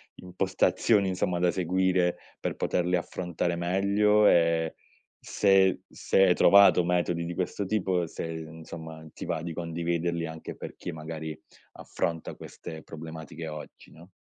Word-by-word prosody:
impostazioni 95 +2 +1
insomma, 90 -1 -1
da 90 0 +3
seguire, 90 0 +1 0.2
per - - -3
poterle 90 0 0
affrontare 85 0 -2
meglio? 100 +4 +3
E 85 -1 +3 0.4
se 95 -2 +3
se 95 - +2
hai 90 - +5
trovato 100 -3 +7
metodi 85 -1 0
di 85 - -4
questo 95 +2 -2
tipo, 95 -3 0
se 80 - -6
insomma, 80 0 -8
ti - - -7
va 80 - -2
di 85 -1 -4
condividerli, 85 0 -2
anche 80 0 -8
per - - -8
chi 90 - -6
magari, 80 0 -6 0.4
affronta 80 -2 -4
queste 80 -1 -9
problematiche 80 0 -8
oggi, 75 -1 -9
no? 85 +4 -15
85 Hz, 135 wpm, -28 LUFS, 80-95 Hz, 0.4 s, trovato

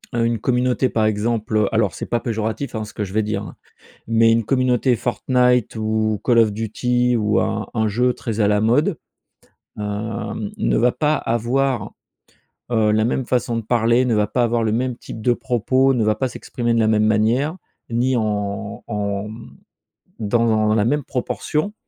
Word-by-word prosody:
heu, 115 -1 +2
une 115 -1 0
communauté 125 +2 +1
par 110 -1 +1
exemple, 110 0 0
alors 110 -3 +1
c'est - - -6
pas 120 - 0
péjoratif 110 +3 -3
ce 105 - -10
que 105 - -3
je 95 -2 -7
vais 110 - +2
dire, 105 0 -2
hein, - - -9 0.5
mais 115 0 +4
une 115 0 +2
communauté 130 0 +2
Fortnite 125 0 +1
ou 110 -1 0
Call 120 -2 +3
of 110 -2 +4
Duty 120 +3 0
ou 105 -2 +1
un 110 -1 -2
un 110 -2 0
jeu 125 +4 +1
très 115 -2 -4
à 105 - +4
la 105 0 +2
mode, 145 - +2 0.8
hem, 105 0 -4
ne - - +1
va 120 +2 +3
pas 150 +4 +1
avoir, 120 0 -1 0.8
heu, 110 -2 +3
la 110 +1 +2
même 125 +2 -1
façon 120 -2 0
de - - -1
parler, 120 +2 +2
ne 120 -3 +1
va 105 0 +2
pas 125 - 0
avoir 120 0 +1
le 110 - 0
même 125 +2 -1
type 110 - -9
de 120 +3 +3
propos, 130 +3 +1
ne 120 -3 +1
va 110 0 +2
pas 130 - -1
s'exprimer 120 -1 -3
de 115 - +2
la 110 - +3
même 110 -1 +3
manière, 115 - +1 0.3
ni 125 +3 +1
en 105 -1 -3
en, 100 -1 -2
mmh, 110 +2 -10 0.7
dans 110 0 +2
la 105 -1 +2
même 145 +4 +1
proportion, 150 +9 -2
115 Hz, 185 wpm, -21 LUFS, 110-125 Hz, 0.8 s, mais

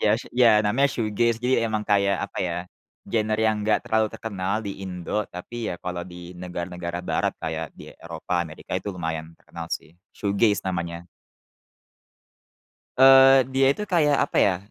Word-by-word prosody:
Ya 105 +1 +3
s 120 - -8
ya 115 -4 +5
namanya 135 +7 +3
Shoegaze 115 -1 0
jadi 125 +3 +1
emang 110 -1 -2
kayak 100 -1 +2
apa 100 - -9
ya, 85 -2 -1 0.5
genre 110 -1 0
yang 110 -1 +1
enggak 105 +1 +1
terlalu 110 0 +1
terkenal 100 -3 -4
di 100 -1 -6
Indonesia 95 +2 -3
tapi 90 +7 -9
ya 90 - -3
kalau 90 0 -5
di 90 0 -10
negara-negara 90 -1 -5
barat - - 0
kayak 80 0 -4
di - - -11
Eropa, 85 +1 -4
Amerika 80 -1 -7
itu 100 - -6
lumayan 80 -1 -4
terkenal 85 -1 -9
sih. 80 - -5 0.2
Shoegaze 100 0 +1
namanya. 85 -2 -3 1.9
Eee, 135 -1 +8
dia 135 0 +4
itu 210 +9 -2
kayak 150 -6 +3
apa - - -6
ya, 95 -3 +3
100 Hz, 160 wpm, -24 LUFS, 90-115 Hz, 1.9 s, Eee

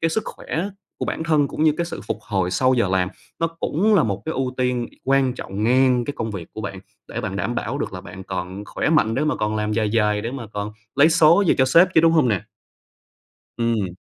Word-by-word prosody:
cái 165 - +2
sức 220 - 0
khỏe 175 +6 -4 0.3
của - - -2
bản 160 - -3
thân 150 -3 +2
cũng 155 - -3
như 155 - +5
cái 170 - 0
sự - - -6
phục - - -2
hồi 95 -4 -1
sau 130 +6 +3
giờ 115 -5 +2
làm, 90 -1 +1 0.3
nó 165 - +3
cũng 165 +5 0
là 185 - +5
một 100 -3 -2
cái 160 - -2
ưu 130 -3 -2
tiên 125 -2 0 0.2
quan 135 -1 +3
trọng 100 -3 -5
ngang 125 0 +3
cái 145 - -4
công 110 -1 -3
việc 90 -5 -7
của 110 - -7
bạn, 95 -2 -6 0.3
để - - -4
bạn - - -4
đảm - - -2
bảo - - -3
được - - -3
là - - -6
bạn 95 - -10
còn 95 +2 -5
khỏe - - -2
mạnh 115 -9 +3
để 140 +5 0
mà 150 - 0
còn 105 0 -1
làm 105 0 -1
dài 110 -1 0
dài, 105 -2 +2
để 115 +3 -4
mà 130 -4 -6
còn 105 +1 -4 0.2
lấy 140 +3 +6
số 165 +4 +5
về - - +4
cho 130 - +5
sếp 165 +8 +6
chứ, - - +7
đúng 165 0 +4
hông 155 -7 +4
nè? 100 -6 0 1.2
Ừm. 115 -6 0
125 Hz, 250 wpm, -22 LUFS, 105-155 Hz, 1.2 s, chứ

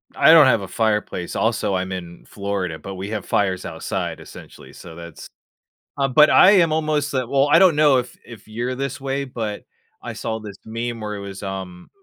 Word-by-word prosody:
I - - +6
don't 155 -4 +8
have 130 - +3
a 95 - -7
fireplace, 105 -5 -2
also, 95 - 0
I'm 95 0 -3
in 85 -2 -8
Florida, 100 -5 -4
but 95 - -8
we 95 +2 -6
have 110 -2 -4
fires 95 -2 -1
outside, - - -4
essentially. - - -13
So, 80 - -12
that's 85 -2 -11 0.7
Um, 135 -2 0
but 150 +2 +7
I 190 - +7
am 175 -6 +4
almost 155 -2 -1
well, 135 +2 +1
I - - +7
don't 185 -5 +5
know 145 -3 +4
if 125 0 -4
if 115 -4 -13
you're 120 +4 -4
this 135 0 -5
way, 135 +1 -2
but 110 -5 -5 0.4
I - - -7
saw 110 0 -4
this 105 -2 -10
meme 115 +1 -5
where 105 0 -4
it - - -7
was, 100 -1 -8
um, 95 -2 -7
110 Hz, 200 wpm, -21 LUFS, 95-135 Hz, 0.7 s, don't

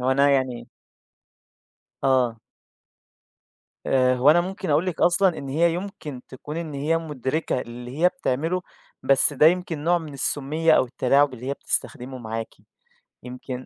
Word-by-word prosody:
هو 125 +1 +1
أنا 140 +1 +4
يعني 130 -3 -1 1.4
آه. 125 -4 +2 1.5
آآ، 130 -1 +3
هو 130 +4 +5
أنا 175 - +5
ممكن 190 0 -4
أقول 150 +5 +2
لِك 180 -3 -3
أصلًا 180 0 +3
إن 140 - -7
هي 165 +4 +2
يُمكِن 175 -8 -6
تكون 145 +4 -8
إن 160 -4 -5
هي 150 +4 0
مدرِكة 150 -2 -2
اللي 120 +3 -8
هي 175 +2 +5
بتعمله، 180 - -2 0.4
بس 135 +2 +4
ده 145 +2 +5
يمكن 165 -3 +1
نوع 175 +1 +3
من 155 -3 -9
السُّمِّيَّة 150 +4 0
أو - - +5
التلاعُب 130 +2 +2
اللي 125 +1 -9
هي 135 - -1
بتستخدمه 130 -1 -4
معاكِ. 115 -1 -5 0.7
يمكن 125 +1 -7
140 Hz, 150 wpm, -24 LUFS, 130-165 Hz, 1.5 s, هو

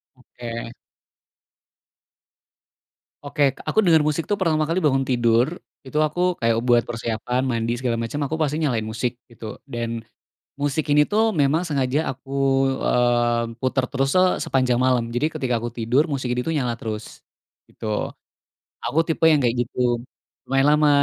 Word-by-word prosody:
Oke. 120 -2 -8 2.6
Oke 145 +1 -1 0.3
aku - - +3
denger 165 -3 +5
musik 155 +2 -1
tuh 205 - +1
pertama 155 -4 +2
kali 165 +4 0
bangun 135 -2 +3
tidur, 120 -1 +3 0.4
itu 140 +3 -2
aku 155 +4 -4 0.2
kayak 115 -1 +2
buat 120 -1 +5
persiapan 120 +2 -2
mandi 115 -1 -1
segala 120 -2 -1
macam 115 +4 -4
aku 155 +3 -2
pasti 150 -1 +1
nyalain 125 -7 +1
musik 115 +2 -2 0.2
gitu, 115 -1 -13 0.2
dan 115 -1 -3 0.6
musik 145 +2 -1
ini 150 +1 +6
tuh 220 +3 +1
memang 155 +4 +2
sengaja 140 -2 0 0.2
aku, 135 +1 -15 0.5
eee, 120 -1 +2
puter 130 +1 0
terus 135 -1 0
se 185 - +6 0.2
sepanjang 130 -2 +1
malam, 125 -2 +1
jadi 120 +6 +1
ketika 130 -5 -1
aku 120 - -4
tidur, 120 +5 +1
musik 130 -5 -2
ini 125 +3 -2
tuh 165 - 0
nyala 120 -5 -1
terus 110 -1 -4 0.6
gitu. - - -11 1.0
Aku 165 - +2
tipe 160 0 +1
yang 155 -3 +5
kayak 120 -1 +1
gitu. 120 0 0 0.5
Lumayan 135 +1 +2
lama 150 -1 +4
130 Hz, 150 wpm, -23 LUFS, 120-150 Hz, 2.6 s, ini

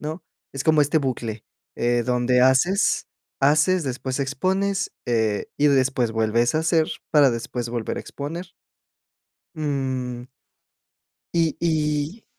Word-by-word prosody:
¿no?, 160 +2 -6 0.3
es 135 -1 -4
como 155 -1 +4
este 150 +2 +3
bucle, 120 -5 -3 0.3
eh, 120 0 +1
donde 125 0 +2
haces 135 +11 +3 0.3
haces, 150 +5 +3
después 130 +1 -3
expones, 190 +9 -1 0.2
eh, 110 -3 0
y 150 - +4
después 130 -3 +2
vuelves 115 +3 +1
a 155 - +3
hacer 160 -1 +2 0.2
para 145 -3 +5
después 120 0 -4
volver 120 -2 -3
a - - -3
exponer. 165 +6 -6 1.1
Mm. 130 -4 -3 1.1
Y, 165 -3 +2
y. 155 +4 -1
140 Hz, 120 wpm, -23 LUFS, 120-155 Hz, 1.1 s, para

